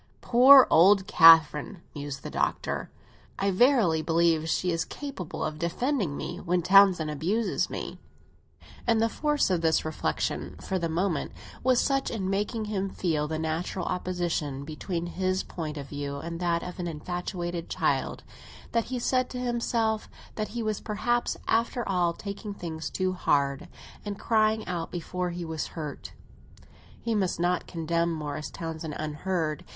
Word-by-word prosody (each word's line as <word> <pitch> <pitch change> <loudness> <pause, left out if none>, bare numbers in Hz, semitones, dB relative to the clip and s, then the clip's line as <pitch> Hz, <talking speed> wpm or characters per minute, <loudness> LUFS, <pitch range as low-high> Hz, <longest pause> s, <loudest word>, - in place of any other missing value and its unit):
Poor 260 +2 +8
old 190 +4 +6
Catherine!" 165 -2 +6
mused 145 -2 -6
the - - -6
Doctor; - - -1 0.5
"I 195 0 +1
verily 200 - +4
believe 165 -1 +2
she 180 +2 +1
is 165 -1 0
capable 270 - -6
of 155 0 -3
defending 180 - -1
me - - -5
when 175 0 0
Townsend 185 -4 +5
abuses 185 +10 0
me!" - - -6 0.9
And 230 -1 +3
the 225 - +3
force 295 -4 +1
of 175 -2 +1
this 160 -1 +2
reflexion, 155 -1 -2
for 190 - -2
the 170 -1 -1
moment, 170 0 -1 0.3
was 255 -1 +4
such 275 -1 +1
in 190 -4 -2
making 210 +3 -1
him 195 -2 -2
feel 155 -6 -1
the 155 +1 -3
natural 160 +3 -2
opposition 175 -6 -2
between 165 +3 -4
his 185 +1 -1
point 155 -3 -6
of 140 -1 -7
view 145 -1 -4
and 170 +3 -6
that 170 -1 0
of 180 +1 -7
an 175 - -2
infatuated 175 +1 -4
child, - - -1 0.5
that 230 -1 +1
he 255 - -4
said 255 +1 +1
to 250 - -6
himself 235 -3 -1 0.2
that 215 -1 -3
he 235 +1 -4
was 215 -2 -2
perhaps, 240 +3 -1
after 235 +1 +1
all, 180 -3 +1
taking 200 +2 -7
things 160 -4 -5
too 185 -1 -1
hard 140 -2 0 0.4
and 205 -1 -5
crying 220 -1 +2
out 170 -2 -3
before 180 +1 -3
he 175 0 -5
was 160 -1 -3
hurt. 150 -3 -6 0.9
He 230 - -2
must 190 -5 0
not 175 0 0
condemn 170 0 -1
Morris 150 -1 -4
Townsend 160 -2 -6
unheard. 155 +1 -2
180 Hz, 155 wpm, -27 LUFS, 160-210 Hz, 0.9 s, Poor